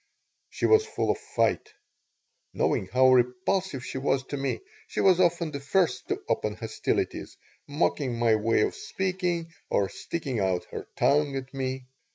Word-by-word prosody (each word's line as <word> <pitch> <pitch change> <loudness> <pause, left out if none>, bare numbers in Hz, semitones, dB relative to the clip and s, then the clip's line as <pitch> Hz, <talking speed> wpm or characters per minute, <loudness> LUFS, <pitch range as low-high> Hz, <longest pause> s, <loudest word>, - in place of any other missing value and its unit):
She - - -2
was 435 0 +6
full 440 - -1
of - - -3
fight. - - 0 0.8
Knowing - - +1
how 130 0 +5
repulsive 130 +5 +1
she 130 - -4
was 135 0 +1
to 145 - -6
me, 135 0 -2 0.3
she - - -4
was 185 -2 +5
often 170 -2 +2
the 140 - -4
first 140 -3 +1
to - - -1
open 105 -2 0
hostilities, 110 0 -2 0.3
mocking 145 -4 0
my 115 -1 +3
way 110 0 +2
of - - +1
speaking, 180 -3 -2 0.2
or 100 -1 +1
sticking 140 -8 -4
out 95 -2 0
her - - -6
tongue 145 -1 +2
at 135 0 -5
me. 130 -1 -3
135 Hz, 160 wpm, -27 LUFS, 125-170 Hz, 0.8 s, was